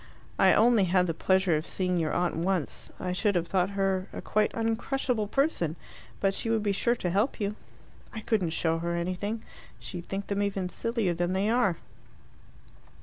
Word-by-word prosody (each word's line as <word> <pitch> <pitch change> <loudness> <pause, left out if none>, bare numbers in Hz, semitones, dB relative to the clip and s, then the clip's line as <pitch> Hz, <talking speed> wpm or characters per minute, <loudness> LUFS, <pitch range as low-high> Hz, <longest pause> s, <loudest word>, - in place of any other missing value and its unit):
"I - - +6
only 225 -3 +5
had 180 0 +3
the 165 - -1
pleasure 190 0 +2
of 155 - -5
seeing 180 -2 0
your 160 -2 0
aunt 175 -1 0
once. 175 -1 -2
I 180 - -2
should 200 +2 +1
have 175 -1 +1
thought 180 +1 +1
her 195 -1 +1
a - - -6
quite 215 0 +1
uncrushable 225 0 0
person. 210 - 0 0.4
But 195 -1 +2
she 225 - -2
would 225 -2 +1
be 205 - +1
sure 235 +5 +1
to 180 -7 -2
help 205 +8 +1
you." 205 0 -1 0.6
"I 220 - -6
couldn't 210 -6 +1
show 165 0 0
her 170 +1 -2
anything. 185 +6 -2 0.3
She'd 175 -2 -8
think 195 0 -3
them 200 0 -1
even 195 -2 -1
sillier 230 -4 -1
than 175 +2 -1
they 200 +3 +1
are." 230 -8 +2
195 Hz, 185 wpm, -28 LUFS, 175-215 Hz, 0.6 s, I